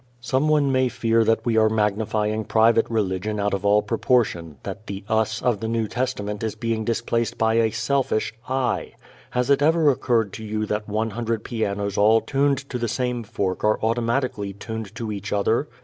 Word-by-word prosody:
Someone 140 +3 +2
may 130 -1 +2
fear 115 -1 +2
that 115 +1 +1
we 115 -2 +1
are 110 0 +5
magnifying 110 0 0
private 115 +2 +3
religion 105 -1 -1
out 100 0 0
of 100 - -2
all 105 +1 +4
proportion, 105 - 0
that 110 - -7
the 100 -1 -6
"us" 110 0 0
of 120 -5 +1
the 110 - -3
New 115 -1 0
Testament 105 -4 -3
is 110 -1 -2
being 115 0 -2
displaced 115 +1 -1
by 110 0 +2
a 115 -1 +3
selfish 115 0 0 0.2
"I." 130 -1 -1 0.4
Has 125 +3 0
it 140 0 +4
ever 160 0 +4
occurred 115 -6 0
to 110 - -7
you 110 0 -2
that 105 0 -3
one 110 +2 -1
hundred 115 0 -2
pianos 100 -3 -2
all 110 +2 +5
tuned 140 +2 0
to 125 - -2
the 120 - -1
same 125 +1 -1
fork 100 -4 -3
are 105 0 +2
automatically 115 -2 0
tuned 110 +1 -7
to 115 -2 -4
each 105 0 -5
other? 110 +7 +1
110 Hz, 185 wpm, -23 LUFS, 105-120 Hz, 0.4 s, are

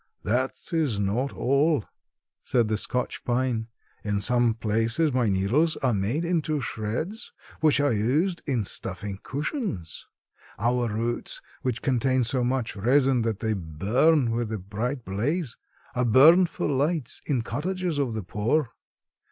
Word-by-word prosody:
"That 125 +4 0 0.2
is 145 -11 +1
not 110 +8 0
all," 140 -1 +1 0.6
said 120 -3 +1
the 110 - +1
Scotch 125 +4 -2
pine. 120 -2 0 0.4
"In 105 -1 -1
some 120 +1 +2
places 115 +7 +1
my 125 -4 +2
needles 120 - +2
are 130 -3 +1
made 110 - -1
into 160 -3 0
shreds 130 - -4 0.3
which 155 -2 +4
are 145 -3 +2
used 150 - +1
in 125 -7 0
stuffing 95 +1 -3
cushions. 150 - -4 0.5
Our 120 +2 +1
roots, 115 +3 -3 0.2
which 125 -3 -2
contain 130 0 +2
so 125 +2 +1
much 125 -1 -1
resin 130 +4 +3
that 110 -2 -2
they 110 -1 0
burn 110 - +2
with 115 -1 -2
a 110 - -2
bright 110 +7 -4
blaze, 125 - -2 0.4
are 125 - 0
burned 160 +10 +7
for - - -3
lights 145 -1 0
in 130 -6 0
cottages 180 +2 -2
of 125 -5 -1
the 110 - -3
poor. 115 - 0
125 Hz, 145 wpm, -26 LUFS, 110-145 Hz, 0.6 s, burned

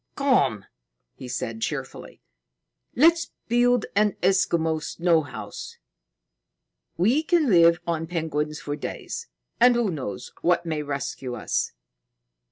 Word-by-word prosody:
"Come!" 140 - +2 0.5
he 130 - -10
said 115 -2 -4
cheerfully. - - -5 0.7
"Let's 330 +5 +4
build 245 0 +3
an 210 -1 +3
Eskimo 170 -4 +2
snow 170 0 +2
house. 110 -8 -8 1.2
We 225 - +3
can 320 -5 +2
live 170 -1 +6
on 165 -1 -2
penguins 155 -3 -2
for 145 +1 -4
days. 460 - -6 0.3
And 245 +1 +6
who 235 -5 +1
knows 135 -10 -6
what 175 0 +2
may 155 -2 -2
rescue 140 -3 -4
us?" 110 - -2
170 Hz, 115 wpm, -25 LUFS, 150-235 Hz, 1.2 s, live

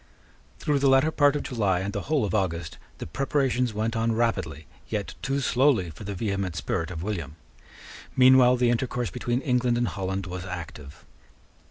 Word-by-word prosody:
Through 145 -2 0
the 140 0 +3
latter 135 +4 +4
part 145 -2 +3
of 145 - -2
July 100 -7 0
and 100 +1 -3
the 100 - -2
whole 145 -3 0
of 100 - -3
August 85 -5 -2 0.2
the - - -6
preparations 130 - 0
went 110 +2 -2
on 115 0 +1
rapidly, 95 -10 -1 0.2
yet 105 -2 -3
too 135 +2 -1
slowly 125 - +2
for 90 +7 -11
the 100 0 -4
vehement 100 -3 -2
spirit 85 +1 -2
of 85 -2 -6
William. 85 -8 -4 0.8
Meanwhile 130 -1 +6
the 120 -1 +3
intercourse 120 -3 -1
between 120 +7 -2
England 125 -2 +1
and 120 0 +1
Holland 95 +2 -3
was 90 -1 -6
active. 85 -6 -8
110 Hz, 175 wpm, -26 LUFS, 90-125 Hz, 0.8 s, Meanwhile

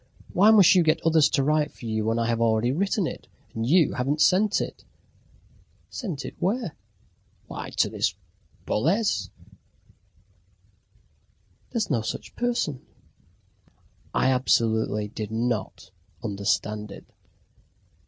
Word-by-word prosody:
Why 200 +4 +5
must 205 -5 +7
you 185 - +5
get 155 -2 +2
others 160 -2 +4
to 140 - +1
write 150 +1 +1
for - - -13
you 110 -1 -1
when 115 +1 0
I 115 - 0
have 115 0 0
already 115 +1 +2
written 195 +5 0
it, - - -6 0.3
and 115 +1 -3
you 165 +1 +4
haven't 135 +4 -1
sent 200 +5 +3
it?" - - -6 1.1
"Sent 180 - -5
it - - -6
where?" 205 -2 -1 0.7
"Why, - - -7
to - - +4
this - - -1 0.5
Boles." 150 - 0 2.4
"There's 220 -7 -2
no 120 -5 +1
such 110 - -6
person." 235 - -1 1.3
I 130 - +2
absolutely 110 -4 +1
did 105 0 -6
not 110 -5 -3 0.3
understand 105 0 -2
it. 100 - -11
130 Hz, 125 wpm, -25 LUFS, 110-180 Hz, 2.4 s, must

